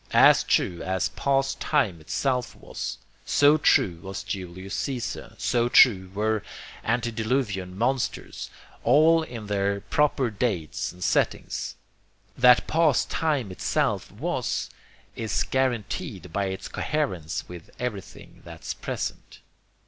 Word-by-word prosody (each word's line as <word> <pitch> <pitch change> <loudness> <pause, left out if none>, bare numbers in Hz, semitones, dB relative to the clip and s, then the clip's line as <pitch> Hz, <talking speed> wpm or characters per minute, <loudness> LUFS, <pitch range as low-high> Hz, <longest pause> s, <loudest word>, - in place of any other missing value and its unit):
AS - - +7
TRUE 85 -1 +1
AS 95 0 -1
PAST 135 0 0
TIME 110 - +1
ITSELF 125 - -1
WAS, - - -6 0.3
so 145 +2 +5
true 90 - +3
was 95 0 -6
Julius 95 -1 -6
Caesar, 125 +1 -4
so 120 -1 +1
true 95 -8 +6
were 110 +1 +1 0.4
antediluvian 110 -5 -1
monsters, 125 +3 -2 0.3
all 155 +6 +5
in 120 -8 -7
their 100 -1 0
proper 140 -3 +1
dates 100 -7 -2
and 90 +1 -9
settings. - - 0 0.6
That 125 0 +6
past 155 -6 +2
time 145 -10 0
itself 90 - -1
was, - - -2 0.4
is 110 -1 -1
guaranteed 120 - -2
by 100 - 0
its 95 0 -4
coherence 95 - -2
with 85 -2 -10
everything 120 -6 -6
that's - - -6
present. - - -5
115 Hz, 115 wpm, -26 LUFS, 95-135 Hz, 0.6 s, AS